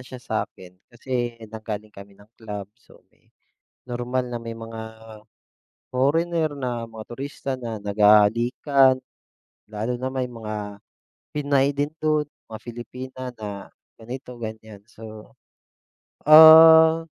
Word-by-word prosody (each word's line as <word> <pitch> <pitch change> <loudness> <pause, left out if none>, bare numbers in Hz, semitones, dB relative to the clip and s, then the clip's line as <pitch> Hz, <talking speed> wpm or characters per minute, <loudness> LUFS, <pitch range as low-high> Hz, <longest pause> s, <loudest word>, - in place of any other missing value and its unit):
siya 130 - -10
sa'kin. 110 -6 -6 0.2
Kasi 120 -1 -4
nanggaling 110 -1 -7
kami 100 0 -14
ng 100 - -18 0.2
club, 105 -2 -7
so 120 - -23 0.8
normal 125 +1 -3
na 120 - -4
may 115 0 -7
mga 115 0 -9 1.1
foreigner, 160 +5 0
na 125 -4 -4
mga 115 -1 -9
turista 135 +2 -6
na 115 -4 -6
nag-hahalikan. 115 +6 +3 0.7
Lalo 110 +3 -4
na 130 - -3
may 130 -1 -2
mga 105 -3 -7 0.5
Pinay 140 -1 0
din 145 +2 -1
do'n, 155 -1 +1 0.2
mga 110 - -7
Filipina 125 +2 -9
na 100 -2 -8 0.3
ganito, 125 +3 -8
ganyan. 110 -2 -8
So, 110 -2 -13 0.9
ah, 160 +1 +9
120 Hz, 110 wpm, -23 LUFS, 110-135 Hz, 1.1 s, ah